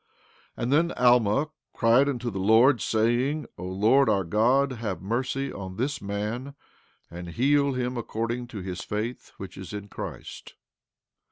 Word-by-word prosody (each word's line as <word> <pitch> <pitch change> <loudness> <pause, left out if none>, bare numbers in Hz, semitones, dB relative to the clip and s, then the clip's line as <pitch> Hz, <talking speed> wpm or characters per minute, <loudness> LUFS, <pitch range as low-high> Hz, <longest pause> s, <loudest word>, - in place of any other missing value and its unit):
15:10 - - -4
And 125 +4 +1
then 170 +3 +3
Alma 125 +2 +3 0.3
cried 120 +4 +4
unto 125 -3 -3
the 95 - -4
Lord, 115 +6 +5
saying: 120 +7 +1
O 90 - -5
Lord 110 +8 +3
our 100 -3 +2
God, 120 +10 +2
have 110 -7 -4
mercy 130 +7 -2
on 95 -2 -7
this 135 +7 -2
man, 105 +7 -4 0.6
and 85 0 -7
heal 140 - +2
him 125 0 -2
according 120 +1 -3
to 110 -5 -7
his 90 -1 -5
faith 110 +4 -4
which 95 -1 -9
is 95 +2 -8
in 100 0 -6
Christ. - - -8
115 Hz, 155 wpm, -26 LUFS, 100-130 Hz, 0.6 s, Lord